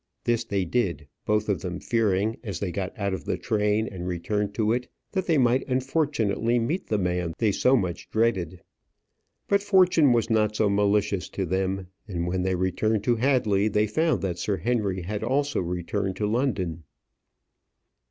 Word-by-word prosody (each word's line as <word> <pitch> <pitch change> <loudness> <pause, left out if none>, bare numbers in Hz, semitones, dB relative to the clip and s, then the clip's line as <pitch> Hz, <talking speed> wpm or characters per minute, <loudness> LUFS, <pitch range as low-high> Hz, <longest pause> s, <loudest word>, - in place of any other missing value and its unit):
This 120 -1 +1
they 100 -4 -1
did, 90 -6 -1 0.2
both 105 0 +1
of 100 -3 0
them 90 -2 -4
fearing, 110 -1 +1
as 100 -7 -4
they 95 -3 -2
got 95 0 -3
out 100 -2 -1
of 95 - -4
the - - -2
train 105 +1 0
and 90 -1 -6
returned 100 +3 -2
to 110 -1 +2
it, 125 +1 -2 0.2
that 190 -2 -2
they 165 -3 +3
might 125 0 +3
unfortunately 130 -4 0
meet 140 +11 -1
the 105 - +1
man 90 -3 -1
they 110 -3 +2
so 125 +6 +3
much 90 -5 -3
dreaded. 100 -6 0 0.8
But 200 0 +3
fortune 185 -8 +4
was 115 -2 +2
not 110 -2 +1
so 105 -2 +2
malicious 100 -1 +1
to 95 - -3
them; 95 +2 -1 0.2
and 85 -4 -3
when 90 +1 -1
they 95 0 0
returned 100 +4 0
to 120 +1 +2
Hadley 110 -6 +2
they 105 0 +2
found 155 +8 0
that 90 -3 -2
Sir 100 +1 -1
Henry 100 -2 -1
had 105 +4 -4
also 140 +4 0
returned 90 +3 -2
to 105 - -1
London. 105 - -1
105 Hz, 175 wpm, -26 LUFS, 95-120 Hz, 0.8 s, fortune